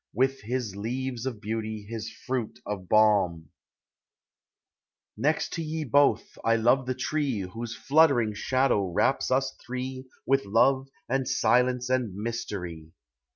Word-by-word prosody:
With 135 +3 +1
his 115 -2 -3
leaves 125 +3 -3
of 120 -5 -4
beauty, 110 0 -4
his 110 +1 -6
fruit 125 -4 -4
of 100 -3 -5
balm; 100 -7 +3 1.6
Next 150 +3 0
to 165 - -3
ye 155 0 -3
both, 145 +1 +2
1 115 0 +2
love 130 +2 +3
the 130 - -1
tree 135 -3 -1
Whose 115 +5 -6
fluttering 140 -7 +3
shadow 130 -1 +1
wraps 90 +9 +1
us 135 +1 +1
three 130 +1 -5 0.2
With 135 -2 +2
love 130 +6 +3 0.2
and 135 0 0
silence 125 0 +2
and 125 -7 0
mystery 100 -7 -5
120 Hz, 130 wpm, -27 LUFS, 105-130 Hz, 1.6 s, balm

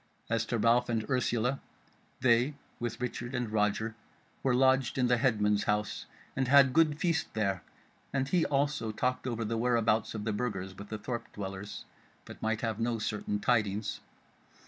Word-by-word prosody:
As 115 0 +1
to 120 - 0
Ralph 120 +3 +3
and 110 -2 -1
Ursula 125 0 0 0.6
they, 125 +3 +3 0.2
with 120 -1 -3
Richard 125 +1 -4
and 120 -3 -2
Roger, 110 +1 +1 0.5
were 130 -2 +2
lodged 130 -1 +3
in 125 - +3
the 125 0 +3
headman's 105 -5 +2
house, 105 0 -1 0.3
and 135 -2 0
had 135 -1 +6
good 155 -2 +4
feast 170 -1 0
there, 100 -4 0 0.5
and 135 -1 0
he 175 +3 +2
also 140 -5 0
talked 125 +4 -1
over 115 -2 -2
the 115 +2 -1
where 120 +1 +2
abouts 115 -1 +1
of 105 - -4
the 110 0 -1
Burgers 95 -4 -3
with 100 +2 -10
the 110 - -3
thorp 120 +3 -5
dwellers, 100 0 -6 0.4
but - - -11
might 110 0 0
have 115 -2 -2
no 115 0 0
certain 105 -1 -2
tidings. 105 -2 0
115 Hz, 170 wpm, -31 LUFS, 105-130 Hz, 0.6 s, had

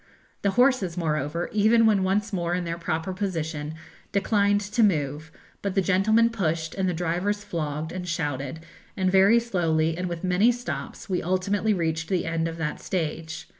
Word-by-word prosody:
The 200 - +2
horses, 245 -9 +3
moreover, 155 0 -1
even 220 +2 +4
when 205 -3 +4
once 200 +3 0
more 175 -1 0
in 180 - -1
their 170 0 -4
proper 165 +1 -2
position, 160 -6 -3 0.4
declined 205 0 +2
to 210 +3 -1
move, 155 -5 +1 0.3
but 200 -1 -2
the 195 - +4
gentlemen 220 +5 +3
pushed 165 -7 -1
and 190 -1 0
the - - -1
drivers 180 +5 -1
flogged 155 -2 -3
and 180 -1 -5
shouted, 145 -3 -3 0.4
and 185 -1 +1
very 195 +5 +6
slowly 165 -8 0
and 180 +1 -3
with 170 0 -5
many 185 +6 +4
stops 245 0 -6
we 185 -3 -1
ultimately 195 +4 +1
reached 165 -2 -1
the 185 -2 0
end 165 0 -1
of 165 0 -5
that 155 -2 -3
stage. 160 -2 -3
180 Hz, 170 wpm, -25 LUFS, 160-200 Hz, 0.4 s, very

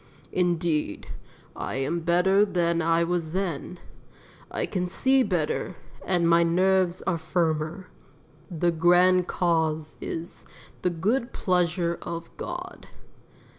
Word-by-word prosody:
Indeed, 170 - -1 0.5
I - - -4
am 140 +6 -1
better 180 +4 +3
than 170 -4 +1
I 165 +1 +2
was 170 -2 -2
then; 180 -2 -3 0.7
I - - -2
can 180 -3 -2
see 265 +8 +2
better, 180 -4 -1 0.3
and 175 -2 +1
my 170 0 +5
nerves 185 +1 +2
are 180 -3 -1
firmer. 160 +1 -1 0.6
The 175 -1 +1
grand 180 +2 +4
cause 160 -3 0
is 165 +1 -6 0.4
'the 180 - +1
good 220 +9 -1
pleasure 175 -2 0
of 170 -1 -7
God.' - - -7
175 Hz, 115 wpm, -26 LUFS, 165-185 Hz, 0.7 s, my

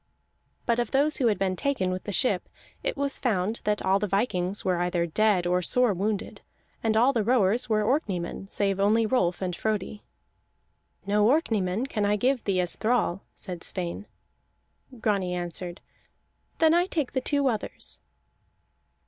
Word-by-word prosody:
But 235 0 +1
of 240 - -1
those 290 +3 +2
who 255 - +2
had 215 - +2
been 190 -1 0
taken 190 -5 -1
with 185 0 -5
the 205 - -3
ship, 200 -3 +1 0.3
it - - -2
was 280 0 +1
found 215 -2 -1
that 210 0 0
all 190 +1 +3
the 210 - -1
vikings 195 -2 0
were 180 -2 +1
either 175 -1 0
dead 190 +1 +2
or 180 +1 +1
sore 245 +4 +3
wounded; 200 +2 -3 0.4
and 220 -1 +1
all 250 +5 +4
the 225 -4 +1
rowers 235 0 +3
were 215 -1 +2
Orkneymen 195 - -2
save 195 -2 0
only 215 +3 +3
Rolf 190 -7 0
and 180 -2 -2
Frodi. 210 0 -3 1.0
"No 205 +1 +3
Orkneymen 225 - +1
can 215 -6 -2
I 205 +1 +2
give 250 +4 +1
thee 195 -2 +1
as 175 - -1
thrall," 215 -5 0
said 180 -4 -8
Sweyn. 180 +2 -5 0.9
Grani 195 -5 0
answered: 175 0 -5 0.8
"Then 320 -1 +4
I 350 +2 +3
take 305 -8 -2
the 260 - -1
two 285 +1 +1
others." 225 -5 -4
210 Hz, 165 wpm, -26 LUFS, 185-245 Hz, 1.0 s, all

